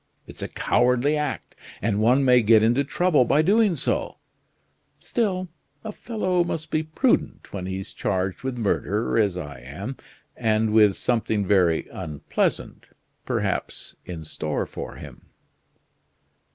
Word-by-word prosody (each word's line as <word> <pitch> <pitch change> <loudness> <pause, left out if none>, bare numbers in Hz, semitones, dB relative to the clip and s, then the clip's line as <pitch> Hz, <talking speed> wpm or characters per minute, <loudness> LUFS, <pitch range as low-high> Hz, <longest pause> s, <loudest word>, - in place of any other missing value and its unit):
It's - - -10
a - - -3
cowardly 125 +4 +2
act 150 -3 -3 0.3
and 105 0 0
one 125 +5 +4
may 125 -1 +6
get 110 0 +5
into 120 +5 +3
trouble 155 0 +2
by 140 +6 +3
doing 205 +1 +3
so; - - -1 0.8
still, 190 -6 -1 0.4
a 220 - -5
fellow 185 -6 -1
must 160 -2 -5
be 155 - +1
prudent 160 - 0
when 95 -2 -4
he's 95 0 -5
charged 95 -2 -2
with 130 -2 -4
murder 105 0 0
as 100 -4 +1
I 75 -6 -7
am, 90 - -7 0.4
and 110 -2 +1
with 105 -3 +5
something 110 -4 0
very 90 -4 +2
unpleasant, 75 -6 -3 0.4
perhaps, - - -2
in 85 -3 -7
store - - -3
for - - -7
him." - - -12
115 Hz, 135 wpm, -24 LUFS, 100-155 Hz, 0.8 s, may